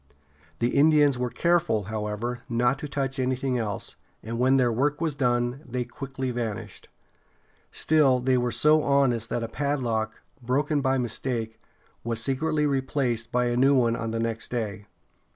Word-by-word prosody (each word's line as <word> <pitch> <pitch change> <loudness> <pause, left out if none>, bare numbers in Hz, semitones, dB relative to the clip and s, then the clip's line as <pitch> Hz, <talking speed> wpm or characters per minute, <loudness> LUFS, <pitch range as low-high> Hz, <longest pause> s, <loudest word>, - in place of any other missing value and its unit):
The 120 - +1
Indians 145 -1 +4
were 125 0 -1
careful, 170 -9 +1
however, 110 +3 -3
not 120 +3 +1
to 150 - -5
touch 135 -1 -3
anything 130 0 0
else, 105 -4 -4 0.3
and 115 +2 -4
when 130 +2 +4
their 125 -2 +3
work 140 +6 0
was 160 -2 -1
done, 120 -1 0
they 125 -2 -3
quickly 135 0 -5
vanished. 115 -3 -5 0.8
Still, 145 -5 +3
they 130 +1 +2
were 125 -1 +1
so 155 +5 +4
honest 135 -6 +2
that 120 - -2
a - - -2
padlock, 120 -5 -2 0.2
broken 145 +4 0
by 135 0 +1
mistake, 115 -2 -3 0.4
was 115 -1 -2
secretly 150 +5 0
replaced 130 -4 -1
by 125 0 +1
a 120 0 0
new 135 +3 +4
one 120 -3 +3
on 115 - -3
the 115 0 -2
next 115 -1 -2
day. 105 -4 -4
125 Hz, 160 wpm, -26 LUFS, 115-140 Hz, 0.8 s, Indians